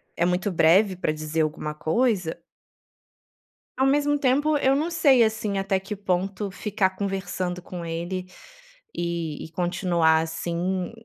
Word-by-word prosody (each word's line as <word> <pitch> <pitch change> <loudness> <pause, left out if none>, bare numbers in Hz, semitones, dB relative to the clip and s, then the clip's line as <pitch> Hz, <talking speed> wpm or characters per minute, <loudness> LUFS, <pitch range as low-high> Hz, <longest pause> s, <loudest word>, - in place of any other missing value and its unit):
é 170 - +1
muito 180 +3 0
breve 185 +4 +4
pra 175 - -1
dizer 155 +1 -2
alguma 150 0 -2
coisa 180 +2 0 1.4
Ao 265 - +3
mesmo 290 +1 +2
tempo, 285 +3 +2
eu 270 -1 +3
não 315 +5 -1
sei, 280 -7 +5
assim, 220 -2 -1
até 195 0 0
que 195 +2 -6
ponto 195 +1 -2
ficar 200 -1 0
conversando 190 -2 -3
com 175 -1 -7
ele, 170 +3 -4 0.7
e 170 -3 -3
e 160 - -12
continuar 175 -2 +2
assim 170 +3 -2
185 Hz, 135 wpm, -25 LUFS, 170-215 Hz, 1.4 s, sei